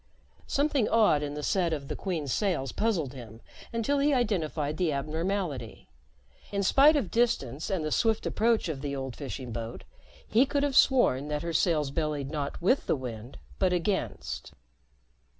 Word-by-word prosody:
Something 280 -5 +1
odd 215 -10 +4
in 145 0 -4
the 150 - -5
set 175 -1 +1
of 140 -3 -4
the - - -4
Queen's 160 -9 -2
sails 170 - 0
puzzled 185 - -1
him 115 -4 -10 0.3
until 235 +5 0
he 285 0 +3
identified 160 - -1
the 175 -4 +1
abnormality. 155 - -3 0.6
In 200 -1 0
spite 280 +10 +6
of 255 -11 -1
distance 165 - 0
and 185 -6 -1
the 155 - -2
swift 225 +4 +1
approach 230 -1 +1
of 150 -5 -4
the 140 -1 -3
old 135 -2 -5
fishing 130 -3 -6
boat, 115 0 -6 0.4
he 230 +5 +4
could 285 +1 0
have 285 -2 0
sworn 150 - +4
that 150 0 -2
her 170 0 -3
sails 155 -4 +2
bellied 150 -2 -2
not 145 -2 -3
with 225 +11 +2
the - - +2
wind, 120 -2 -7 0.2
but 185 -1 +2
against. 105 - -2
160 Hz, 170 wpm, -28 LUFS, 140-215 Hz, 0.6 s, spite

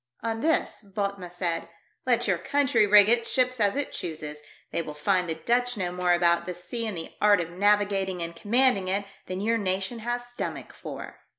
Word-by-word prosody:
On 225 0 -2
this, 320 -3 0
Bothnia 200 -2 -4
said, 170 -2 -2 0.2
" - - -43
Let 240 -1 +3
your 185 -4 +1
country 245 0 +2
rig 205 0 +8
its 235 0 +2
ships 255 -1 +1
as 205 0 +2
it 285 0 -1
chooses, 150 -3 -6 0.3
they - - -1
will 150 -2 -7
find 180 +3 +1
the 160 - -1
Dutch 245 +7 0
know 180 -3 -2
more 180 0 +1
about 170 0 +2
the 180 - -4
sea 230 +6 -4
and 205 -5 -4
the 165 - -6
art 205 -2 +5
of 170 -1 -3
navigating 195 -1 +1
and 170 0 -6
commanding 215 0 +3
it 200 +2 0 0.2
than 185 +1 -4
your 230 +2 +1
nation 190 +3 -2
has 240 +2 -3
stomach 245 0 -6
for." - - -8
200 Hz, 200 wpm, -27 LUFS, 180-230 Hz, 0.3 s, rig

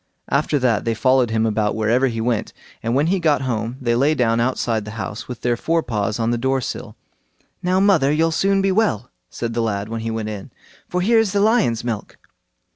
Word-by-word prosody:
After 145 +2 +1
that 120 -6 +1
they 115 -1 -1
followed 130 +1 +3
him 110 0 +1
about 105 -1 0
wherever 115 +4 +2
he 115 -2 -3
went, 115 -1 -1 0.3
and 115 +2 -1
when 140 +3 +3
he 190 +3 +1
got 150 -5 +2
home, 115 -1 -2
they 120 -3 0
lay 140 +6 +2
down 115 -3 +2
outside 115 -2 0
the 105 - -8
house, 105 0 -5
with 125 -2 -7
their 120 -1 +1
fore 165 +6 0
paws 105 -2 -2
on 115 0 0
the 120 - -1
door 135 +2 +1
sill. 125 - -6 0.7
"Now, 185 +1 +1
mother, 185 -9 +4
you'll 165 +2 +2
soon 195 +4 +2
be 195 - +2
well", 185 - 0 0.2
said 115 -1 -4
the 120 - 0
lad, 105 -2 -2
when 115 0 -4
he 115 - -3
went 110 -1 -3
in, 105 -2 -7 0.4
"for 180 - -1
here 225 +5 +4
is 215 -3 +1
the 200 - +2
lion's 205 - +2
milk." 115 -4 -5
120 Hz, 220 wpm, -21 LUFS, 115-155 Hz, 0.7 s, mother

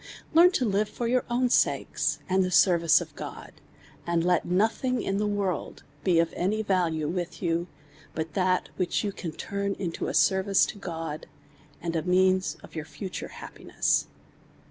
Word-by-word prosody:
Lrearn 345 +3 +7
to 255 - +1
live 205 0 +1
for 240 - -4
your 250 +1 +1
own 245 +1 +2
sakes, - - +1
and 190 0 +2
the 185 - -1
service 170 -2 +5
of - - -9
God, - - -8 0.6
and 170 -1 +1
let 175 -1 +2
nothing 225 +7 +1
in 195 -3 -1
the 210 - 0
world 200 -5 -2 0.2
be 180 -3 +3
of 165 0 +2
any 210 +5 0
value 170 -6 0
with 175 +2 -4
you, 170 0 0 0.5
but 160 0 -4
that 185 -1 +1
which 180 +3 0
you 205 - -1
can 175 -4 -6
turn 200 +4 -3
into 170 -4 -4
a - - -3
service 190 0 +4
to 205 - -7
God, 165 -4 -5 0.6
and 170 -1 -2
a 160 - +1
medns 185 +2 +2
of - - -13
your 155 -2 -5
future 160 +5 -6
happiness. - - -1
185 Hz, 170 wpm, -27 LUFS, 170-200 Hz, 0.6 s, Lrearn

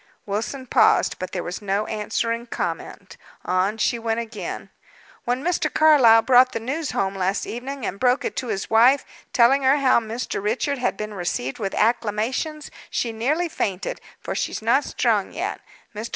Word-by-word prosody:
Wilson 225 +6 -3
paused, - - +3
but 185 - -5
there 180 - -3
was 180 - -5
no 205 +1 -1
answering 230 +2 -2
comment. - - -5 0.3
On 185 +4 +1
she 235 +2 0
went 225 0 -1
again. 230 -2 -6 0.5
"When 245 +3 -1
Mr. 355 +1 0
Carlyle 260 -8 +6
brought 255 +1 +5
the - - -2
news 285 +7 -3
home 195 0 -1
last 190 +1 -1
evening, 260 +1 -5
and 195 - -4
broke 250 +2 +2
it - - -3
to 255 - -2
his 195 -4 -3
wife, 245 +5 +4 0.3
telling 255 +3 +4
her 270 +2 +4
how 270 -4 +4
Mr. 225 -1 -4
Richard 250 +7 -1
had 245 - -1
been 215 0 -5
received 170 -9 -3
with 195 -3 -3
acclamations, 235 +7 -1 0.2
she 235 - -1
nearly 290 +10 0
fainted, 195 - -3 0.2
for - - -5
she's - - -2
not - - +3
strong - - 0
yet. - - -4 0.3
Mr. 220 +3 -5
230 Hz, 170 wpm, -23 LUFS, 210-260 Hz, 0.5 s, Carlyle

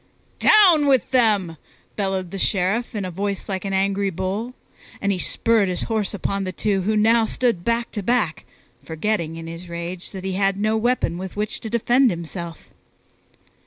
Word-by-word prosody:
"Down 365 -9 +6
with 265 -3 +2
them!" 210 -10 +2 0.4
bellowed 190 -3 -2
the 195 - -5
Sheriff 210 +7 0
in 205 -3 -2
a 185 - -4
voice 200 +2 -3
like 190 0 -3
an 195 - -2
angry 195 +1 +1
bull; 195 +7 -3 0.4
and 200 - 0
he 190 - -1
spurred 220 +1 +1
his 180 - -2
horse 220 -3 -1
upon 200 0 -2
the 185 - -3
two 195 +1 0
who 215 +4 0
now 225 +2 +4
stood 230 -6 0
back 235 +2 0
to 210 - -4
back, 210 -6 0 0.4
forgetting 165 -1 -2
in 165 - -7
his 165 +2 -8
rage 170 +1 -5
that 190 -2 -8
he 190 0 -2
had 195 0 +1
no 215 +1 +1
weapon 220 -7 0
with 190 0 -6
which 210 +1 -3
to 220 - -6
defend 240 +3 +3
himself. 170 -1 -6
200 Hz, 180 wpm, -22 LUFS, 185-225 Hz, 0.4 s, Down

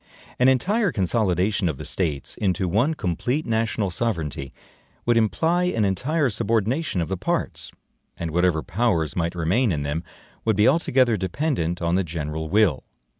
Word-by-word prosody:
An 125 - +5
entire 195 - +2
consolidation 100 - +1
of 75 - -3
the 75 - -7
States 75 -2 -2
into 95 -2 0
one 120 - +1
complete 120 - -1
national 110 -3 0
sovereignty 80 - -3 0.5
would 120 - +3
imply 160 - +2
an 115 - +1
entire 130 - 0
subordination 115 - 0
of 80 - -1
the 95 - -2
parts; - - -2 0.5
and 85 -1 -4
whatever 90 -1 +2
powers 90 - 0
might 85 0 -1
remain 95 +8 +1
in 75 -3 -1
them, 75 +4 -2 0.4
would 110 -2 +2
be 105 +4 +4
altogether 130 -7 +3
dependent 95 - -1
on 85 0 +1
the 95 +2 +2
general 80 -1 -4
will. 100 -8 +3
95 Hz, 155 wpm, -24 LUFS, 85-120 Hz, 0.5 s, An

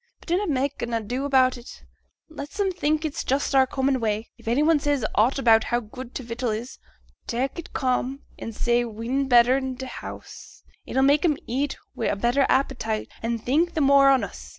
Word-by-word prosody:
But - - -15
dunnot 365 +2 +1
mak' 280 0 -1
an 235 0 -2
ado 240 +5 -3
about 260 -2 +3
it, 240 - -13 0.4
let 315 +3 -9
'em 390 -2 +2
think 310 -3 0
it's 300 - -3
just 275 +2 0
our 265 -1 +5
common 265 0 0
way. 220 -1 -2
If - - -19
any 245 +6 +2
one 320 -1 +4
says 285 -5 0
aught 235 +7 +3
about 225 -4 +4
how 240 - 0
good 245 +2 -10
t' 260 - -4
vittle 235 +1 -3
is, 225 +4 -5 0.5
tak' 265 +6 -2
it 335 - -9
calm, 260 +1 -1 0.2
and 225 - -6
say 240 +1 +1
we'n 235 +4 -2
better 245 +1 +5
i' 265 -1 -3
t' 260 +1 -7
house, 255 - -10 0.2
it'll 265 - +1
mak' 285 +2 +4
'em 310 -5 +2
eat 270 +4 -2 0.2
wi' 230 - -2
a - - 0
better 240 +6 +2
appetite, 225 -5 0
and 230 -1 -3
think 325 +7 +1
the 315 - +1
more 275 0 +6
on 270 -1 +4
us. - - -8
260 Hz, 205 wpm, -24 LUFS, 235-280 Hz, 0.5 s, more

